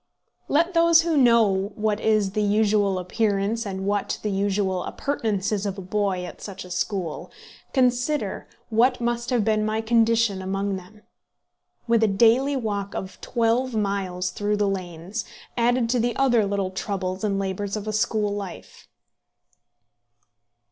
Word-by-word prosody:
Let 335 +5 +2
those 335 -1 +6
who 335 -2 0
know 220 -7 +3
what 210 -1 0
is 215 -3 +2
the 210 +1 -1
usual 205 -1 +2
appearance 205 +3 -1
and 190 -1 -4
what 205 0 -1
the 210 - -1
usual 195 -2 0
appurtenances 210 -6 -2
of 195 0 -4
a - - -5
boy 190 -1 -1
at - - -10
such 195 -2 -7
a 180 - -11
school, 180 -2 -3 0.4
consider 255 +3 0 0.2
what 250 +3 +3
must 235 0 -1
have 240 -5 +1
been 215 -1 +2
my 215 +1 0
condition 225 -3 +2
among 195 +1 -2
them, 190 +3 -11 0.8
with 230 -1 +3
a 220 - +4
daily 235 +7 +3
walk 205 -5 -3
of 185 0 -6
twelve 235 +1 0
miles 195 -3 -1
through 205 0 -1
the 205 -1 +1
lanes, 185 +2 -4 0.3
added 240 0 +2
to 250 - +2
the 235 0 0
other 240 -6 +3
little 195 -2 -1
troubles 190 -1 -3
and 200 -2 0
labours 195 +1 -2
of 210 0 -6
a 215 - -2
school 215 -1 0
life! 200 -4 -8
210 Hz, 150 wpm, -24 LUFS, 195-230 Hz, 0.8 s, those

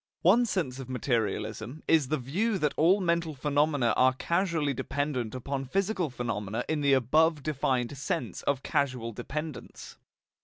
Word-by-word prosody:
One 235 +8 +5
sense 145 - -2
of 130 -1 -7
materialism 120 +2 -2
is 155 -5 +4
the 155 - 0
view 190 - -1
that 150 -5 0
all 180 +6 +4
mental 170 -3 0
phenomena 145 -2 +1
are 130 0 +4
causally 170 -4 0
dependent 130 -3 -2
upon 135 +2 -3
physical 190 - 0
phenomena 115 -2 -3
in 155 -1 -1
the 140 -1 +4
above 150 +4 +3
defined 135 -3 -1
sense 125 -6 -3
of 135 -2 -1
causal 130 -4 -1
dependence. 150 +6 -7
140 Hz, 145 wpm, -29 LUFS, 125-160 Hz, -, One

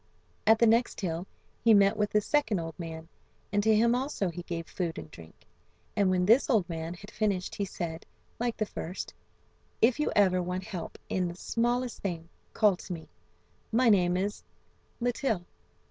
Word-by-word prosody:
At 220 0 +7
the 235 - +5
next 230 +2 +3
hill 175 0 -2 0.4
he 225 -2 +7
met 200 0 +5
with 210 -1 0
the 210 - +3
second 285 -3 +1
old 165 -1 -4
man, 160 -1 -6 0.5
and 205 - +3
to 220 +1 +4
him 230 +2 +4
also 250 -6 -1
he 175 +1 -6
gave 170 -1 -5
food 170 -2 -3
and 80 - -8
drink. 80 -2 -14 0.5
And 200 -2 +3
when 180 -1 +2
this 230 +9 +5
old 215 -9 +3
man 165 0 -4
had 200 +4 -12
finished 200 -4 -1
he 200 - -2
said, 165 -3 -5 0.3
like 240 -1 -1
the 215 - 0
first: 180 -2 -6 0.7
"If 235 +4 +4
you 300 - +1
ever 185 -3 +4
want 180 +1 -3
help 185 -4 -6
in 185 -1 0
the 170 - -6
smallest 240 +5 -1
thing 170 -4 -4 0.2
call 210 -4 +3
to 185 - -6
me. 160 -2 -9 0.6
My 235 +2 +4
name 180 -4 +4
is 200 +3 -2 0.6
Litill." 240 -6 0
195 Hz, 180 wpm, -29 LUFS, 175-225 Hz, 0.7 s, At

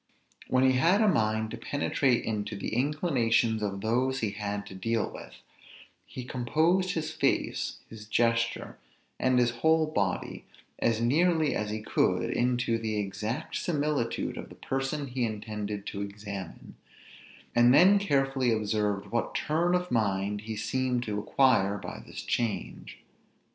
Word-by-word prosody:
When 130 0 +2
he 130 -1 +4
had 175 +9 +4
a 215 - +4
mind 110 - +1
to - - -5
penetrate 135 -3 0
into 105 -1 -3
the 100 - -4
inclinations 125 -5 +1
of 100 -2 -3
those 130 +5 0
he 110 -3 0
had 105 0 -4
to - - -10
deal 115 +4 -1
with, - - -10 0.7
he 130 - -7
composed 160 +10 +1
his 155 -1 -2
face, 140 -3 0
his 105 -1 -11
gesture, 115 +1 0 0.4
and 130 -1 +2
his 120 -1 +3
whole 160 0 +4
body, 100 -12 -2 0.4
as 115 -1 +1
nearly 155 +5 +2
as 105 -1 -2
he 110 0 -4
could - - +1
into 120 -1 +1
the 110 -1 -2
exact 105 +8 -3
similitude 145 -7 -1
of - - -7
the - - -12
person 135 +2 -2
he 125 -1 -3
intended 105 -2 -4
to 100 - -5
examine; 100 -2 -7 0.8
and 120 +1 +6
then 185 +9 +7
carefully 135 -8 +1
observed 105 -2 -1
what 120 0 -1
turn 170 +4 +1
of 180 0 -2
mind 100 -3 0
he 110 0 -5
seemed 125 +2 -1
to 105 -3 -3
acquire 105 -3 +3
by - - -7
this - - -8
change. 115 -3 -3
120 Hz, 150 wpm, -28 LUFS, 105-140 Hz, 0.8 s, then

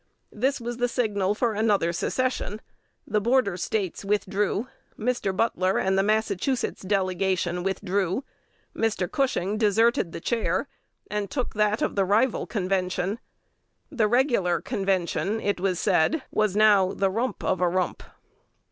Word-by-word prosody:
This 265 +6 0
was 240 0 -5
the 245 0 +1
signal 210 -5 0
for 230 0 0
another 205 -5 +1
secession: 220 +2 -1 0.5
the 210 0 0
Border 235 -4 +2
States 185 +2 -2
withdrew; 205 +2 0 0.3
Mr. 235 -3 -1
Butler 190 -4 +1
and 190 0 +1
the 195 - +4
Massachusetts 215 +4 0
delegation 185 -2 0
withdrew; 195 +3 -1 0.5
Mr. 220 -5 0
Cushing 215 -7 0
deserted 220 -3 +3
the - - -6
chair, 230 +6 -1 0.4
and 210 -2 -2
took 255 -4 -3
that 210 0 +1
of - - -1
the 200 - +3
rival 215 +6 +1
Convention. 185 0 -1 0.7
The 230 -7 +2
"regular" 235 - +2
Convention, 195 +2 -1
it 205 -3 -1
was 185 -2 0
said, 205 - +2
was 215 -2 +1
now 205 -3 +5
"the 195 -1 +1
rump 235 +6 -2
of 185 -1 0
a 180 - +3
rump." 185 0 -1
205 Hz, 140 wpm, -26 LUFS, 190-225 Hz, 0.7 s, now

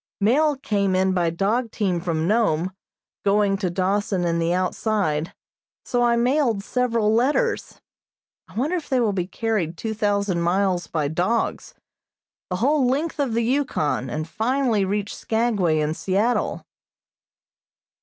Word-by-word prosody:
Mail 280 +8 +3
came 200 -7 0
in 190 0 +2
by 175 -2 +1
dog 210 +8 0
team 195 -6 -1
from 165 -2 -1
Nome, 185 -5 +1 0.5
going 200 0 +3
to 190 -3 -1
Dawson 190 +1 0
and 170 0 0
the 165 +1 +1
outside, 180 -3 0 0.5
so 245 - 0
I 240 -1 +3
mailed 240 -3 +1
several 230 -3 +1
letters. 290 - 0 0.7
I - - -17
wonder 285 +10 0
if 320 - -7
they 260 -3 +2
will 220 -4 +1
be 180 -2 -2
carried 195 -6 -2
two 220 -1 -3
thousand 200 -4 0
miles 180 0 +1
by 155 -3 -1
dogs 185 - -1 0.7
the 180 - -1
whole 265 +6 +2
length 295 +6 -1
of 260 -6 0
the 235 - +1
Yukon, 230 - 0
and 155 +5 -3
finally 230 +1 +1
reach 205 +1 -2
Skagway 215 -8 +1
and 155 +1 0
Seattle. 205 +8 0
205 Hz, 145 wpm, -23 LUFS, 180-235 Hz, 0.7 s, Mail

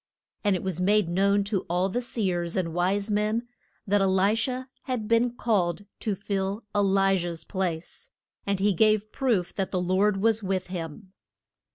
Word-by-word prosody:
And 205 -2 +3
it 180 - -3
was 185 -2 -2
made 205 0 +3
known 200 +3 +2
to 200 -2 -1
all 180 +2 +1
the 240 +6 -2
seers 180 -8 -1
and 165 -3 -1
wise 195 +4 0
men 215 +3 0 0.4
that 205 -1 +2
E - - +4
li 190 +2 +3
sha 250 +3 -1 0.2
had 250 -5 -2
been 230 +2 +3
called 205 -6 0
to 210 -3 -1
fill 200 +2 -2
E - - +3
li 195 -1 +3
jah's 170 -1 -4
place, 185 - -4 0.3
and 200 -1 -1
he 200 +1 +3
gave 215 +2 +2
proof 225 -10 0
that 195 -2 -2
the 185 - -1
Lord 190 +3 +2
was 225 +2 +2
with 190 -2 -1
him. 175 +3 -6
195 Hz, 180 wpm, -26 LUFS, 185-215 Hz, 0.4 s, E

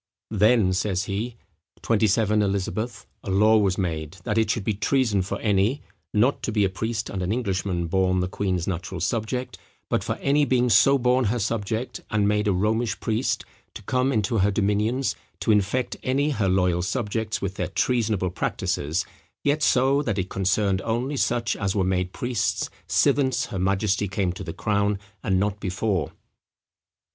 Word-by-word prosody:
"Then," 105 -2 +4
says 95 0 0
he, 105 +5 -3 0.5
"XXVII. 110 -1 +3
Eliz. 100 -2 0
a 115 -1 -6
law 105 +3 +5
was 95 -3 +1
made, 80 -4 -2
that 105 - -1
it 110 -2 +1
should 105 0 0
be 110 - 0
treason 110 -1 +1
for 90 - -4
any, 105 +6 +1 0.3
(not 120 +6 +2
to - - -2
be 105 -2 +2
a - - +1
priest 110 +4 -3
and 95 - -4
an 90 +2 -1
Englishman, 95 -6 -1
born 95 +1 +1
the 90 - 0
queen's 90 -2 -1
natural 95 0 -4
subject,) 115 +7 -2 0.3
but - - 0
for - - -2
any 145 +2 +2
being 125 -2 +2
so 135 +7 +6
born 125 0 +2
her 110 +4 +1
subject, 110 +2 -2
and 105 -1 +2
made 105 +1 +1
a - - +3
Romish 105 +3 0
priest, 115 +4 -1 0.3
to - - -9
come 130 +5 +1
into 110 -1 +1
her 100 +2 +3
dominions, 105 +6 0 0.2
to 115 - +1
infect 110 +5 +1
any 140 +4 +1
her 105 -8 0
loyal 90 -2 +2
subjects 110 +2 -2
with 95 -1 -3
their - - -3
treasonable 110 -7 0
practices; 80 -1 -1 0.4
yet 145 +2 +1
so, 135 +2 +3
that 105 -8 -2
it 95 -1 -2
concerned 95 0 +1
only 120 +7 -1
such 120 -3 0
as 95 -2 -2
were 100 - +2
made 90 -1 0
priests 120 0 -1 0.2
since 130 -3 +2
her 95 - -5
majesty 100 +2 +1
came 95 -2 -1
to 95 - -7
the 85 - -5
crown, 100 +3 0 0.2
and 95 -1 +1
not 105 +1 -1
before." 95 -3 -1
105 Hz, 170 wpm, -24 LUFS, 95-115 Hz, 0.5 s, so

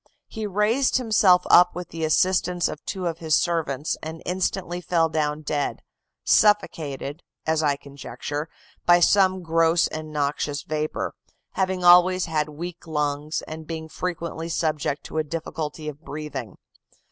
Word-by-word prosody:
He 220 -2 -5
raised 210 +8 +2
himself 210 -7 +4
up 180 0 +7
with 180 -1 -6
the 165 0 -5
assistance 180 +2 +2
of 150 - -7
two 185 -2 -4
of 165 -1 -2
his 160 -2 +2
servants, 160 -4 0
and 160 +1 -7
instantly 180 -1 -2
fell 165 -2 +1
down 155 -1 -1
dead, 145 -1 -2 0.4
suffocated, 160 -8 +2 0.2
as 160 0 +1
I 145 -2 +2
conjecture, 145 +2 -6 0.4
by 175 0 +7
some 185 0 +4
gross 165 0 +3
and 155 0 -6
noxious 145 0 -1
vapor, 155 0 -3 0.4
having 190 -1 -1
always 180 +1 +6
had 155 -2 -1
weak 170 +3 -8
lungs, 150 0 -2
and 155 0 -8
being 160 -1 -5
frequently 170 -1 -4
subject 155 -3 -1
to 160 - -4
a - - +1
difficulty 155 0 -5
of 150 0 -7
breathing. 145 - -6
160 Hz, 145 wpm, -24 LUFS, 150-180 Hz, 0.4 s, up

